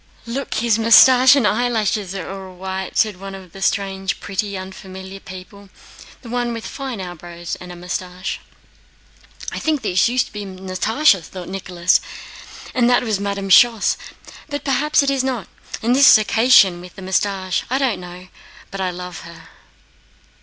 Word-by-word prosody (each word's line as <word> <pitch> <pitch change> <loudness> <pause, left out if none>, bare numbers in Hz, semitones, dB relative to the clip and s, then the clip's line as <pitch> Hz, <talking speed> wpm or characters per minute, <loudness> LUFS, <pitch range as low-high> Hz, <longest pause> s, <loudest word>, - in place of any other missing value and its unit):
"Look, 255 +4 -4
his 225 -1 +1
mustache 255 +3 +7
and 275 -6 +2
eyelashes 215 -4 0
are 190 - -5
all 190 -1 -8
white!" 190 +1 -5
said 210 -4 +1
one 195 0 -7
of 185 -2 -12
the 195 - -12
strange, 195 0 -1
pretty, 200 0 -3
unfamiliar 190 0 -9
people—the 195 +6 -14
one 240 0 -2
with 230 -1 -6
fine 265 -6 -6
eyebrows 175 -1 -7
and 180 -1 -9
mustache. 180 +1 -5 1.1
"I - - -5
think 305 -5 -1
this 190 +2 +2
used 250 +1 +1
to - - -16
be 210 -1 -5
Natásha," 190 - +1
thought 180 +2 -9
Nicholas, 180 -2 +1 0.7
"and 245 -2 +3
that 245 - +3
was 215 -4 -1
Madame 200 -1 -3
Schoss, 230 0 +5 0.5
but 285 -1 -4
perhaps 285 +2 +2
it's 275 -1 +1
not, 255 -7 -3 0.4
and 240 +2 +3
this 280 +1 +6
Circassian 215 -4 +5
with 180 -1 -13
the 190 - -10
mustache 190 -1 -1
I 260 - +1
don't 255 -8 0
know, 180 +1 -11 0.4
but 195 - -5
I 185 - 0
love 180 0 -7
her." 165 -1 -13
195 Hz, 155 wpm, -20 LUFS, 185-235 Hz, 1.1 s, mustache